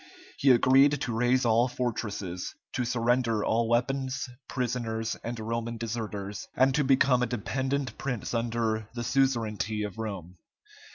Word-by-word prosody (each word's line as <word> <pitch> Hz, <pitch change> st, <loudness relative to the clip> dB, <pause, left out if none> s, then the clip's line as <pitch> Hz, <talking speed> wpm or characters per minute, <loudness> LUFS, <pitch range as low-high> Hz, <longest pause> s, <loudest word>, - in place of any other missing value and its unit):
He 140 Hz, -, +4 dB
agreed 135 Hz, +3 st, +5 dB
to 120 Hz, -5 st, -2 dB
raze 125 Hz, +3 st, +2 dB
all 115 Hz, +2 st, +4 dB
fortresses, 105 Hz, -8 st, -3 dB, 0.2 s
to 125 Hz, -, -1 dB
surrender 120 Hz, -2 st, +1 dB
all 115 Hz, 0 st, +1 dB
weapons, 130 Hz, +3 st, 0 dB, 0.2 s
prisoners, 115 Hz, -3 st, -2 dB
and 115 Hz, 0 st, -4 dB
Roman 115 Hz, +1 st, -3 dB
deserters, 105 Hz, -3 st, -4 dB
and 130 Hz, +1 st, +4 dB
to 150 Hz, -, +2 dB
become 130 Hz, -1 st, +4 dB
a 125 Hz, -, +2 dB
dependent 130 Hz, +2 st, -2 dB
prince 125 Hz, -6 st, -3 dB
under 115 Hz, -2 st, -1 dB
the 120 Hz, -, -3 dB
suzerainty 115 Hz, -5 st, 0 dB
of 105 Hz, 0 st, -6 dB
Rome. 95 Hz, -5 st, -5 dB
120 Hz, 135 wpm, -28 LUFS, 110-130 Hz, 0.2 s, agreed